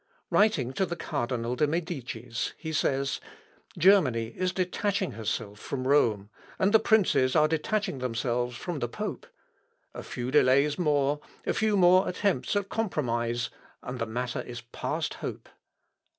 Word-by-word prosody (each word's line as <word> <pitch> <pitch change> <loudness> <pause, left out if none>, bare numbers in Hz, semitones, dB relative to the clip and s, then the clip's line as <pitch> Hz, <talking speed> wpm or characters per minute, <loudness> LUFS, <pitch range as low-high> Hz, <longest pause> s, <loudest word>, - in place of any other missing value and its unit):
Writing 155 - +3
to 190 - 0
the 175 -2 -2
Cardinal 125 -6 -2
de 150 +4 +2
Medicis, 130 - -3
he 160 -1 -5
says, 140 -2 0 0.6
"Germany 140 - +4
is 185 0 0
detaching 190 +1 -1
herself 105 -1 -4
from 130 +1 -4
Rome, 110 -8 +2 0.3
and 195 +3 +2
the 220 - +8
princes 185 -14 +3
are 155 -1 +5
detaching 160 0 -1
themselves 120 0 -1
from 170 +3 -4
the 120 - -2
pope. - - -5 0.7
A - - -6
few 125 +1 -5
delays 140 +2 +4
more 145 -3 +2 0.3
a - - +1
few 215 -2 +2
more 185 0 +5
attempts 200 +2 0
at 200 -1 0
compromise 120 - -1 0.3
and 125 0 -5
the 115 - -1
matter 120 +2 -3
is 120 0 -8
past 120 -1 -3
hope. - - -6
140 Hz, 145 wpm, -28 LUFS, 120-180 Hz, 0.7 s, the